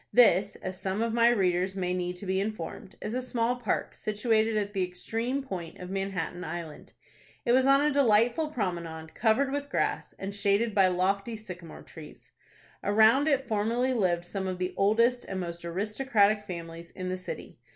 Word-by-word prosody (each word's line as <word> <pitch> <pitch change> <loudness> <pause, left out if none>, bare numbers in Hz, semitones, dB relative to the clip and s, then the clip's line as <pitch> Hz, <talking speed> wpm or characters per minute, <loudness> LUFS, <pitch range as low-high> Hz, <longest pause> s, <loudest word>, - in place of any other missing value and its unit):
This, 205 -5 +5
as 185 0 -7
some 190 +3 -1
of 230 -1 -1
my 235 0 +5
readers 190 -3 +1
may 180 -1 -1
need 180 0 -2
to 180 - -8
be 190 0 0
informed, 210 -2 -5
is 210 - -3
a 255 - -1
small 245 -1 0
park 240 -3 -2
situated 220 +1 +1
at 205 -1 -2
the 195 - 0
extreme 225 +9 -3
point 175 -9 -6
of 180 0 -8
Manhattan 195 -2 -3
Island. 165 -2 -7 0.5
It 235 - +3
was 260 +2 +4
on 275 +1 +6
a 300 +1 +3
delightful 245 +2 +3
promenade, 170 - -4
covered 245 +5 +2
with 285 0 -3
grass, - - -1
and 195 +1 -5
shaded 205 +2 +1
by 195 -2 +5
lofty 195 +5 0
sycamore 180 -6 -9
trees. 155 -2 -13 0.5
Around 220 +8 +5
it 270 -3 +2
formerly 230 +4 +1
lived 175 -7 +1
some 190 +1 -4
of 185 -1 -3
the 180 0 -2
oldest 230 +5 +3
and 190 - -4
most 170 -1 -5
aristocratic 210 +3 +1
families 170 -2 -7
in 185 -1 -5
the 185 - -1
city. 185 - -8
200 Hz, 180 wpm, -28 LUFS, 180-235 Hz, 0.5 s, on